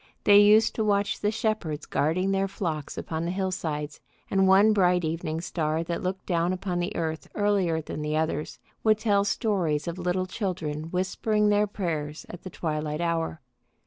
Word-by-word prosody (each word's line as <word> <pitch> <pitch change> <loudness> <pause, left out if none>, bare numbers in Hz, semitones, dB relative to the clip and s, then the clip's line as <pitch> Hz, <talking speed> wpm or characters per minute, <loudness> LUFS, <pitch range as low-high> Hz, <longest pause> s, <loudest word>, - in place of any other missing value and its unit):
They 205 0 +7
used 210 +2 +6
to 220 - -1
watch 205 -1 +1
the 210 - +1
shepherds 215 -9 -2
guarding 185 +6 0
their 195 0 +1
flocks 160 -6 -4
upon 160 0 -3
the 170 - -2
hillsides, 165 -6 -3 0.3
and 195 -1 +3
one 200 +3 +6
bright 180 -3 +3
evening 160 0 -3
star 160 -1 -1
that 170 +3 -3
looked 185 0 -3
down 175 0 +1
upon 185 -1 -2
the 175 +4 -2
earth 160 -1 -3
earlier 195 -6 +1
than 155 - -6
the 150 0 -1
others, 155 -1 -2 0.3
would 215 -1 +4
tell 205 -2 +2
stories 190 - 0
of 170 +2 -4
little 180 +1 0
children 180 -6 -3
whispering 210 +4 +1
their 210 0 +3
prayers 160 -7 -4
at 175 - -9
the 185 - -7
twilight 155 -3 -3
hour. 165 -2 -1
180 Hz, 175 wpm, -27 LUFS, 160-200 Hz, 0.3 s, They